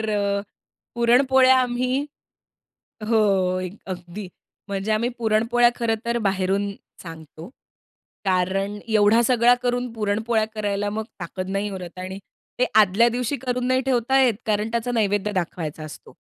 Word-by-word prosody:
तर 220 - -3 0.9
पुरणपोळ्या 260 +2 +5
आम्ही 255 +2 -1 1.0
हो. 195 -5 +2
एक 185 +2 -6
अगदी 185 +1 -7 0.4
म्हणजे 200 +2 -2
आम्ही 225 +3 +1
पुरणपोळ्या 230 +2 +3
खरं 230 -2 0
तर 235 0 0
बाहेरूनच 195 -1 -1 0.3
सांगतो. 160 -1 -10 0.8
कारण 195 +2 0
एवढा 215 +1 +4
सगळा 240 0 +4
करून 245 -1 -1
पुरणपोळ्या 220 +1 0
करायला 205 -1 -2
मग 220 +1 -3 0.2
ताकत 185 +2 -5
नाही 200 +1 -2
उरत 185 -2 -8
आणि 185 +1 -6 0.4
ते 250 - +3
आदल्या 215 +2 +5
दिवशी 245 +3 -2
करून 250 0 -1
नाही 255 0 +2
ठेवता 265 +1 +2
येत 250 -4 +4
कारण 215 +1 0
त्याचा 235 +1 -2
नैवेद्य 205 -2 0
दाखवायचा 165 -4 -4
असतो. 155 - -11
215 Hz, 135 wpm, -23 LUFS, 195-240 Hz, 1.0 s, पुरणपोळ्या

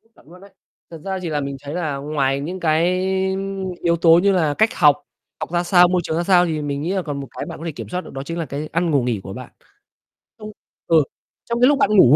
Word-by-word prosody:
Chuẩn - - -22
luôn 180 +2 -15
đấy. 200 - -15 0.4
Thật 165 - -8
ra 190 -1 -2
thì 170 - -4
là 150 -1 -1
mình 140 0 -4
thấy 145 +2 -6
là 155 -6 -2
ngoài 140 -1 -1
những 180 +6 -5
cái 170 +3 +2 0.8
yếu 170 0 +3
tố 165 0 +7
như 200 - +4
là 160 -6 +2
cách 220 +8 +2
học, 145 -1 +4 0.4
học - - -5
ra 175 0 +1
sao, 175 0 +5
môi 180 0 +1
trường 160 - -2
ra 170 - 0
sao, 180 -1 +4
thì 155 -2 -2
mình 145 -1 -3
nghĩ 170 +4 -2
là 190 - 0
còn 145 -4 -5
một 135 - -6
cái - - -4
bạn 165 -2 -8
có 165 - -7
thể 165 - -2
kiểm - - -8
soát 180 0 -3
được - - -12
đó 135 0 -5
chính 165 +3 -5
là 165 - -2
cái 145 +2 -5
ăn, 165 0 0
ngủ, 140 -4 +2
nghỉ 120 -5 -1
của 95 - -7
bạn. 125 +2 -9 0.9
Trong 215 0 -8 0.4
ừ, 160 -3 +5 0.4
trong 235 0 -2
cái 250 - +7
lúc 290 -1 +4
bạn 275 - +3
ngủ 140 -4 +7
165 Hz, 270 wpm, -21 LUFS, 145-180 Hz, 0.9 s, tố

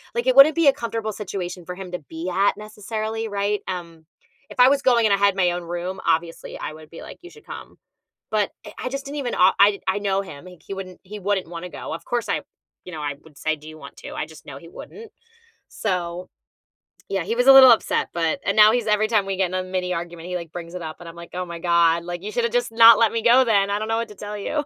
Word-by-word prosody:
like, 235 +2 -2
it 255 - +3
wouldn't 280 +3 +8
be 330 -3 +3
a 275 - +7
comfortable 225 -4 -4
situation 185 -3 -6
for 180 - -7
him 185 -1 -9
to 180 - -3
be 165 +3 -5
at 195 +3 +1
necessarily, 215 +1 -5
right, 205 0 -1
um, 170 -3 -7 0.4
if - - -12
I 250 - +8
was 280 0 +2
going 240 -3 +3
and 210 - +3
I 200 - +3
had 200 -1 +3
my 180 -2 +3
own 175 0 -4
room, 175 +2 -5
obviously 165 +1 -2
I - - -5
would 155 0 -14
be 165 - -11
like, - - -11
"You 355 - -12
should 445 +4 -18
come." - - -10 0.5
But 210 -2 0 0.2
I - - -9
I - - -1
just 275 +1 -5
didn't 290 +1 -6
even 255 -4 -3
o 185 +1 +5
I 200 0 +5
I 190 +2 +1
know 195 -1 0
him, 150 -4 -11
he 180 - -11
c - - -31
he 195 - -4
wouldn't 185 -2 -9
he 210 +2 -9
wouldn't 195 -3 -1
wanna 175 +1 -7
go. - - -7
Of 165 - -8
course, 240 -1 -2
I - - -1 0.4
you 180 - -10
know, 155 - -6
I 145 -1 -3
would 150 -3 -18
say, 155 0 -1
"Do 150 +1 -14
you 155 0 -11
want - - -12
to?" - - -9
I 150 - -3
just 160 -1 -16
know 140 -2 -9
he 165 - -14
wouldn't. 440 - -11 0.6
So, 180 -3 -3 0.8
yeah, 195 -3 -1
he 220 +6 -2
was 245 +2 +1
a 270 - +10
little 265 -2 +10
upset, 230 - +1
but 165 -2 -1
and 200 - 0
now 215 0 +8
he's 230 -1 -1
every 210 +1 +2
time 215 -4 +2
we 195 -1 -3
get 190 - +1
in 180 - -10
a 185 - -1
mini 185 -1 -3
argument, 170 0 -6
he, 180 - -3
like, 170 -3 -6
brings 170 0 -8
it 180 - -5
up, 160 -1 -7
and 175 - -11
I'm 165 - -12
like, 170 0 -11
"Oh 180 0 -3
my 170 -1 -8
God, 170 -1 +2
like, 175 +1 -6
you 210 - -5
should 240 - -1
have 235 - -2
just 245 -1 0
not 230 -1 +8
let 230 -2 +4
me 230 - -1
go 245 +2 +6
then. 200 -3 +2
I 205 +1 -1
don't 215 - -4
know 225 - +1
what 230 -1 -3
to 210 - -12
tell 210 +1 -7
you." 295 +8 -2
195 Hz, 280 wpm, -22 LUFS, 175-225 Hz, 0.8 s, a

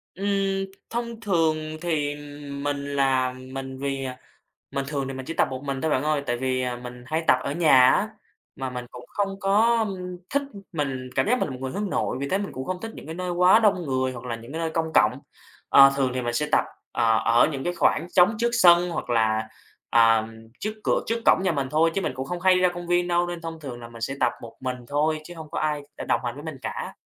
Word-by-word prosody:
Ừm, 195 0 0 0.2
thông 235 -1 -4
thường 165 -7 +2 0.2
thì 150 -4 -1 0.4
mình 140 +1 -2 0.2
là 130 -2 +2
mình 130 +1 -7
vì 135 -1 -2 0.6
mình 140 0 -2
thường 140 -2 -2
thì 135 - -5
mình 130 0 -6
chỉ 165 - -4
tập - - +2
một 130 +1 -5
mình 135 -1 -3
thôi, 160 - 0
bạn 130 - +2
ơi. 150 -1 +1
Tại 120 -1 0
vì 130 0 -1 0.2
mình 125 0 -9
hay 160 +2 -1
tập - - +6
ở 140 - -2
nhà 135 -6 +6
á, - - +1 0.5
mà 130 -1 -4
mình 125 -1 -5
cũng 125 0 -10
không 195 -1 -2
có 220 +3 +3 0.4
thích 280 +1 +1 0.3
mình 135 -5 -3
cảm - - +2
giác 250 +3 +3
mình - - 0
một 130 - -5
người 130 -1 -3
hướng 205 -1 -3
nội, - - -1
vì 140 - -2
thế 190 - +1
mình 200 - -4
cũng 130 +1 -5
không 185 -1 -3
thích 225 +2 -5
những 160 +3 -8
nơi 180 0 -3
quá 180 +4 +6
đông 200 -5 +3
người 130 -1 0
hoặc 120 -1 -9
là 120 -2 -3
những 115 +4 -11
cái 160 - -4
nơi 165 -1 -1
công 160 0 -2
cộng. - - +4 0.5
Ờ, 135 0 +8
thường 135 -2 +1
thì 130 - -1
mình 120 0 -2
sẽ 150 +3 0
tập, - - +4 0.3
ờ, 115 -2 +3
ở 115 +1 +5
những 135 -1 -4
cái 175 - 0
khoảng 170 0 +2
trống 180 +5 +6
trước 235 0 +2
sân 175 -6 +6
hoặc 160 - -4
là, 110 -1 +2 0.4
ờ, 115 -1 +5 0.3
trước 215 - -2
cửa - - +2
trước 230 - 0
cổng - - +5
nhà 185 -3 +2
mình 135 -3 -1
thôi. 165 +2 +3
Chứ 195 - +1
mình - - -2
cũng 130 +1 -5
không 175 +2 -4
hay 185 0 +5
ra 180 0 +4
công 175 0 -6
viên 175 0 +2
đâu, 175 0 +2
nên 175 -1 -5
thông 165 -1 -7
thường 130 -5 -7
là 115 - -9
mình 115 -1 -12
sẽ 135 +4 -2
tập 120 -1 +3
một 115 - -10
mình 130 -1 -2
thôi, 155 +2 +1
chứ 175 +2 -10
hông 160 -2 -10
có - - -3
ai 150 -1 0
để - - -5
đồng - - +1
hành 120 -1 -2
với 145 +3 -10
mình 155 -4 -6
cả. - - -5
150 Hz, 250 wpm, -25 LUFS, 130-175 Hz, 0.6 s, Ờ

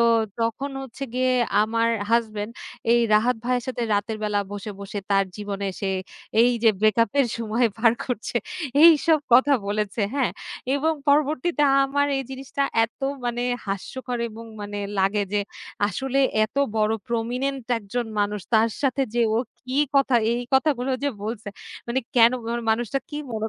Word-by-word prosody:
তো - - +5 0.4
তখন 250 +5 -2
হচ্ছে 265 +1 -7
গিয়ে 255 0 +2 0.3
আমার 230 +1 +1 0.2
হাসব্যান্ড 220 -2 0 0.4
এই 240 - +5
রাহাত 235 +3 +3
ভাইয়ের 250 -1 0
সাথে 250 -2 -3
রাতের 210 +2 -1
বেলা 210 -1 +1
বসে, 205 +1 -5
বসে 200 +1 -5
তার 195 0 +4
জীবনে 200 -1 -4
সে 195 - -1 0.5
এই 240 +1 +6
যে 225 - +8
ব্রেকআপ 215 +2 +3
এর 265 - +3
সময় 230 +1 +1
পার 230 0 +5
করছে 240 -1 -3 0.5
এইসব 325 -1 +7
কথা 265 +4 +6
বলেছে, 210 +1 -2
হ্যাঁ 260 -9 +1 0.4
এবং 315 +3 +1 0.2
পরবর্তীতে 300 +2 +2 0.2
আমার 285 +1 +1
এই 270 - -1
জিনিসটা 270 +1 -3 0.2
এত 225 - -11 0.2
মানে 240 0 -1 0.2
হাস্যকর 245 +6 -4
এবং 225 +1 -10 0.2
মানে 205 0 -5 0.2
লাগে 195 +2 +2
যে 205 - +2 0.5
আসলে 265 +7 -2 0.3
এত 215 - -10 0.2
বড় 215 0 +2 0.2
প্রমিনেন্ট 250 +3 -2
একজন 230 +3 -4
মানুষ। 205 0 -1
তার 225 +1 +4
সাথে 275 0 +1
যে 240 - +3
ও - - +3 0.3
কি 260 +2 0 0.2
কথা 270 -3 +4 0.2
এই 240 +1 -1
কথাগুলো 265 -2 +2
যে 285 - +2 0.2
বলছে। 220 -1 -5 0.4
মানে 250 +3 0 0.2
কেন 230 0 +8 0.2
মানে 235 +1 -2
মানুষটা 235 +3 0
কি 295 - -6 0.2
মনে 220 0 -2
235 Hz, 160 wpm, -24 LUFS, 215-265 Hz, 0.5 s, যে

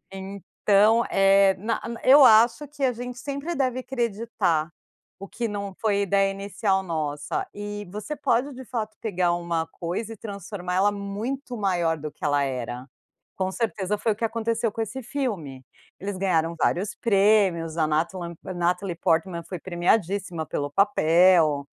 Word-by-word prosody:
Então, 200 +3 +2
eh, 195 0 +5
na 220 +5 -2
na 235 -1 -6
eu 275 +2 +8
acho 235 +5 +5
que 285 0 -7
a 260 - +4
gente 245 +1 -7
sempre 280 +5 -4
deve 255 -2 0
creditar, 225 -10 -1 0.5
o 195 - -8
que 235 +3 -3
não 200 -2 -5
foi 205 -2 +2
ideia 195 0 +2
inicial 195 0 -1
nossa, 150 -4 -3
e 205 -1 -6
você 210 +9 -5
pode 275 0 0
de 260 +1 -9
fato 220 -3 -4
pegar 180 -5 +1
uma 170 -2 -2
coisa 190 +6 -3
e - - -13
transformar 200 -3 -5
ela 200 +2 +3
muito 220 +6 -5
maior 175 -5 +1
do 150 0 -6
que - - -18
ela 145 -1 +2
era, 125 -2 -4 0.5
com 190 0 -1
certeza 210 -2 -2
foi 220 +2 0
o - - -14
que 225 - -7
aconteceu 230 0 -1
com 225 - -4
esse 260 +5 -6
filme. 210 - -4 0.4
Eles 200 +1 -4
ganharam 170 -3 +1
vários 190 +6 0
prêmios, 195 -7 +2
a 155 -2 +2
Natalen 170 +3 -2
Natalie 180 0 -1
Portman 170 +1 0
foi 180 - -6
premiadíssima 180 0 0
pelo 145 -1 -3
papel, 170 -5 +4
195 Hz, 155 wpm, -25 LUFS, 175-225 Hz, 0.5 s, eu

